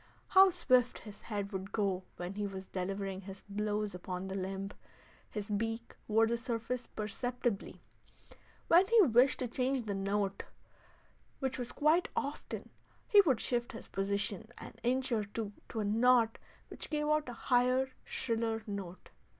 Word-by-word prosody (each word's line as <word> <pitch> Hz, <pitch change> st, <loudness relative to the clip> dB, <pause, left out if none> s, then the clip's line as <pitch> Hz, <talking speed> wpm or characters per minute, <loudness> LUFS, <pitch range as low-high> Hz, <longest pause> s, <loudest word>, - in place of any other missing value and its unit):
How 385 Hz, 0 st, +8 dB
swift 255 Hz, -9 st, +3 dB
his 210 Hz, -2 st, -11 dB
head 205 Hz, -2 st, -4 dB
would 190 Hz, 0 st, -5 dB
go 195 Hz, -4 st, 0 dB, 0.2 s
when 175 Hz, +2 st, -4 dB
he 205 Hz, 0 st, -2 dB
was 190 Hz, -1 st, -6 dB
delivering 195 Hz, +1 st, -3 dB
his 195 Hz, 0 st, -9 dB
blows 210 Hz, 0 st, -1 dB
upon 180 Hz, +1 st, -5 dB
the -, -, -4 dB
limb! 195 Hz, +1 st, -3 dB, 0.6 s
His 210 Hz, 0 st, -5 dB
beak 225 Hz, +2 st, -2 dB
wore 225 Hz, +1 st, +4 dB
the 235 Hz, +1 st, 0 dB
surface 235 Hz, +1 st, -3 dB
perceptibly. 240 Hz, 0 st, -3 dB, 0.8 s
When 355 Hz, +3 st, +6 dB
he 460 Hz, +1 st, +7 dB
wished 255 Hz, -2 st, +5 dB
to 255 Hz, -, -1 dB
change 255 Hz, +2 st, 0 dB
the 210 Hz, -2 st, -3 dB
key, 195 Hz, 0 st, -1 dB, 0.9 s
which 265 Hz, -1 st, -2 dB
was 245 Hz, -1 st, -4 dB
quite 310 Hz, +4 st, +3 dB
often, 285 Hz, +1 st, -4 dB, 0.4 s
he 415 Hz, -3 st, +8 dB
would 260 Hz, -6 st, +4 dB
shift 240 Hz, 0 st, -1 dB
his 230 Hz, -, -9 dB
position 200 Hz, +1 st, -1 dB
an -, -, -9 dB
inch 255 Hz, +2 st, +1 dB
or 220 Hz, -3 st, +2 dB
two 205 Hz, 0 st, -5 dB, 0.2 s
to 220 Hz, -, -2 dB
a -, -, -1 dB
knot 230 Hz, +2 st, +4 dB, 0.3 s
which -, -, -5 dB
gave 300 Hz, -1 st, 0 dB
out 305 Hz, -3 st, +2 dB
a -, -, -5 dB
higher, 255 Hz, +2 st, +2 dB
shriller 225 Hz, -2 st, -1 dB
note. 195 Hz, -4 st, -6 dB
225 Hz, 160 wpm, -33 LUFS, 200-250 Hz, 0.9 s, How